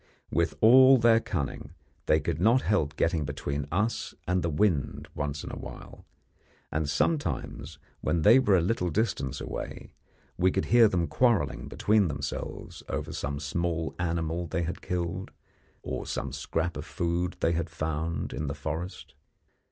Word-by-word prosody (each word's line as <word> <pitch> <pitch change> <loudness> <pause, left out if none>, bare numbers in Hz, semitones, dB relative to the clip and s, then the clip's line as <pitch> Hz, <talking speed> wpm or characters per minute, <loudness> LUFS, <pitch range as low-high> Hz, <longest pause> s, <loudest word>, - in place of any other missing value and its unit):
With 85 -1 +1
all 130 +4 +8
their 115 -1 +5
cunning, 75 -4 -4 0.3
they - - +4
could 80 - -3
not 115 +6 +4
help 80 -8 +1
getting 80 -1 +1
between 70 0 -3
us 105 +7 -1
and 90 +1 +1
the 85 - 0
wind 75 -3 0
once 75 0 -3
in - - -6
a - - -6
while, - - -10 0.6
and 75 0 -1
sometimes, 75 - -1 0.2
when 85 -2 0
they 115 +5 +8
were 105 -7 +4
a - - +3
little 90 0 0
distance 75 - -1
away, - - -6 0.5
we 95 - +5
could 95 +1 -1
hear 120 -2 +8
them 90 -4 +1
quarrelling 120 +1 +1
between 105 -2 +2
themselves 70 -1 -5
over - - -3
some 70 0 -3
small 80 +3 -2
animal 85 0 -1
they 85 +2 -1
had 90 +2 -4
killed, 90 +1 -3 0.5
or - - -4
some - - -3
scrap 80 +1 -2
of 75 - -6
food 85 +1 -1
that - - -28
they 80 - +3
had 85 0 -1
found 80 -1 -3
in 75 +4 -3
the 70 - -3
forest. 80 +1 -5
85 Hz, 160 wpm, -28 LUFS, 75-95 Hz, 0.6 s, all